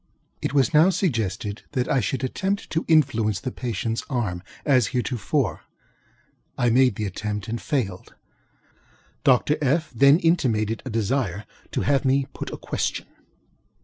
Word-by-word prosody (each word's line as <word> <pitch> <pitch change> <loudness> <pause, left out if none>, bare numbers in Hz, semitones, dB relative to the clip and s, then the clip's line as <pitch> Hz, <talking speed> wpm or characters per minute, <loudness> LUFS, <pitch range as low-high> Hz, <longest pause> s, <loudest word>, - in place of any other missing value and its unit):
It - - -1
was 140 +3 +2
now 155 +4 +6
suggested 110 - -1
that 125 -3 0
I 135 - +2
should 130 +1 -2
attempt 190 +9 -2
to 165 - -1
influence 115 - +3
the 130 - -3
patientŌĆÖs 115 -2 -3
arm, 105 -10 -2 0.2
as 130 -6 +4
heretofore. 125 -3 -1 1.0
I 120 -1 +2
made 125 -2 +4
the 105 - -3
attempt 105 +2 -4
and 115 +1 -4
failed. 115 - -3 1.1
Dr. 135 +3 +3
FŌĆöŌĆö 150 +3 0
then 140 +4 +6
intimated 115 -11 +1
a - - -4
desire 110 -3 -1 0.3
to - - 0
have 140 0 +2
me 135 0 +2
put - - -6
a - - -5
question. - - -3
125 Hz, 145 wpm, -24 LUFS, 110-140 Hz, 1.1 s, now